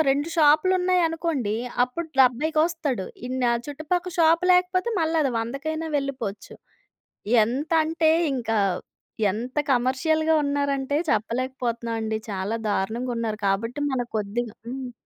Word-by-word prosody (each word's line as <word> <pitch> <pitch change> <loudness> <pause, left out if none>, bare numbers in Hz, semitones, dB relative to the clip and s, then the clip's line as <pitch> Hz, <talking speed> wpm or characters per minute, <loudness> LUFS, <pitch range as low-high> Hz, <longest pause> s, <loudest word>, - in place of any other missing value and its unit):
2 285 +3 +1
షాప్‌లు 310 +3 +5
ఉన్నాయనుకోండి. 330 - 0 0.3
అప్పుడు 285 +7 -6
70కి 265 +5 +3
ఒస్తాడు. 310 - -2 0.2
ఇన్న 255 +1 -3 0.2
చుట్టుపక్కల 320 +5 -2
షాప్ 330 +1 +4
లేకపోతే 365 +4 +2
మళ్ళీ 325 0 +1
అది 275 - +1
వందకైనా 290 +8 -3
వెళ్ళిపోవచ్చు. 260 -7 -4 0.9
ఎంతంటే 315 +6 +1 0.2
ఇంక 240 -4 -4 0.8
ఎంత 235 +6 -6 0.2
కమర్షియల్‌గా 315 +6 +2
ఉన్నారంటే 280 -1 0
చెప్పలేకపోతున్నామండి. 230 -1 -1
చాలా 195 +2 -2
దారుణంగా 225 +6 -1
ఉన్నారు. 220 -2 -2
కాబట్టి 230 +7 -1
మన 260 -2 0 0.2
కొద్దిగ 215 +3 -2 0.2
హ్మ్. 255 0 -5
270 Hz, 110 wpm, -24 LUFS, 235-320 Hz, 0.9 s, షాప్‌లు